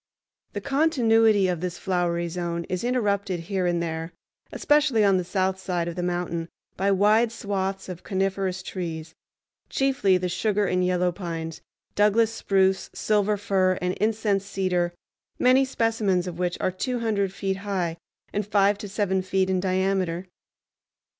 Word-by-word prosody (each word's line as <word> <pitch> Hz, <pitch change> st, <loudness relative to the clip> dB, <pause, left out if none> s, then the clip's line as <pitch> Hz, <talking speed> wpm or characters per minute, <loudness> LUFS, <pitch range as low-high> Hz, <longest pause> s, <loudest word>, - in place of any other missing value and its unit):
The -, -, -4 dB
continuity 225 Hz, -, +3 dB
of 175 Hz, -3 st, -2 dB
this 180 Hz, -1 st, -3 dB
flowery 175 Hz, -2 st, -1 dB
zone 170 Hz, 0 st, -3 dB
is 185 Hz, +2 st, -4 dB
interrupted 200 Hz, -7 st, 0 dB
here 185 Hz, +1 st, -1 dB
and 170 Hz, -1 st, 0 dB
there, 165 Hz, 0 st, -4 dB, 0.4 s
especially 290 Hz, -7 st, +3 dB
on 195 Hz, -1 st, +4 dB
the 180 Hz, -, 0 dB
south 190 Hz, +1 st, -1 dB
side 180 Hz, -2 st, -2 dB
of 170 Hz, -, -4 dB
the 180 Hz, -, -3 dB
mountain, 175 Hz, -1 st, -2 dB, 0.3 s
by 195 Hz, +2 st, 0 dB
wide 210 Hz, +4 st, +4 dB
swaths 195 Hz, -3 st, -3 dB
of 180 Hz, -2 st, -7 dB
coniferous 190 Hz, -1 st, -1 dB
trees, 165 Hz, -4 st, -5 dB, 0.6 s
chiefly 265 Hz, -9 st, +2 dB
the 180 Hz, 0 st, -2 dB
sugar 205 Hz, +3 st, 0 dB
and 180 Hz, -1 st, +1 dB
yellow 180 Hz, 0 st, +1 dB
pines, 165 Hz, -3 st, -5 dB, 0.3 s
Douglas 215 Hz, +2 st, +3 dB
spruce, 190 Hz, -3 st, +1 dB
silver 210 Hz, -1 st, +1 dB
fir, 190 Hz, -2 st, +1 dB
and 180 Hz, 0 st, -1 dB
incense 210 Hz, -2 st, +1 dB
cedar, 180 Hz, -3 st, -1 dB, 0.4 s
many 255 Hz, +2 st, +5 dB
specimens 225 Hz, -8 st, 0 dB
of 175 Hz, -1 st, -6 dB
which 180 Hz, -1 st, -1 dB
are -, -, 0 dB
two 245 Hz, +6 st, -3 dB
hundred 200 Hz, -4 st, 0 dB
feet 195 Hz, 0 st, -2 dB
high 190 Hz, -4 st, -2 dB, 0.4 s
and 205 Hz, -, 0 dB
five 200 Hz, 0 st, +3 dB
to 205 Hz, -, -6 dB
seven 190 Hz, -2 st, 0 dB
feet 190 Hz, 0 st, 0 dB
in 185 Hz, -, +1 dB
diameter. 185 Hz, -1 st, 0 dB
190 Hz, 155 wpm, -25 LUFS, 180-205 Hz, 0.6 s, many